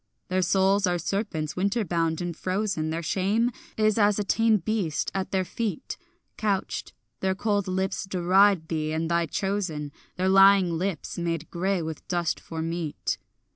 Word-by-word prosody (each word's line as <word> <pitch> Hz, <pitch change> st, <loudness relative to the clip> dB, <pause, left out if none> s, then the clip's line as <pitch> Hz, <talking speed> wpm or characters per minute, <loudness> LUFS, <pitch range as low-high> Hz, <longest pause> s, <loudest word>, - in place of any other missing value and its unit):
Their 185 Hz, +1 st, +1 dB
souls 195 Hz, +1 st, +3 dB
are 175 Hz, 0 st, +1 dB
serpents 170 Hz, -4 st, -2 dB
winterbound 180 Hz, -5 st, 0 dB
and 175 Hz, -1 st, -3 dB
frozen, 185 Hz, -3 st, -1 dB
Their 165 Hz, +1 st, -3 dB
shame 205 Hz, +8 st, +1 dB, 0.3 s
is 215 Hz, 0 st, +3 dB
as 205 Hz, -1 st, +4 dB
a 210 Hz, -, 0 dB
tame 225 Hz, +2 st, +3 dB
beast, 190 Hz, -5 st, -1 dB
at 190 Hz, -1 st, -2 dB
their 190 Hz, -1 st, 0 dB
feet 210 Hz, -4 st, -3 dB, 0.4 s
Couched; 200 Hz, -3 st, -2 dB, 0.3 s
their 190 Hz, 0 st, 0 dB
cold 205 Hz, -1 st, 0 dB
lips 190 Hz, +1 st, -1 dB
deride 185 Hz, -1 st, +3 dB
thee 155 Hz, -1 st, -2 dB
and 160 Hz, +1 st, -1 dB
thy 170 Hz, -1 st, +2 dB
chosen, 180 Hz, -6 st, -2 dB, 0.2 s
Their 185 Hz, +1 st, 0 dB
lying 195 Hz, -2 st, +6 dB
lips 175 Hz, -1 st, -3 dB
made 165 Hz, -2 st, -3 dB
grey 185 Hz, 0 st, 0 dB
with 160 Hz, -1 st, -6 dB
dust 175 Hz, -3 st, 0 dB
for 160 Hz, -1 st, -5 dB
meat. 165 Hz, -2 st, -3 dB
185 Hz, 155 wpm, -26 LUFS, 165-200 Hz, 0.4 s, lying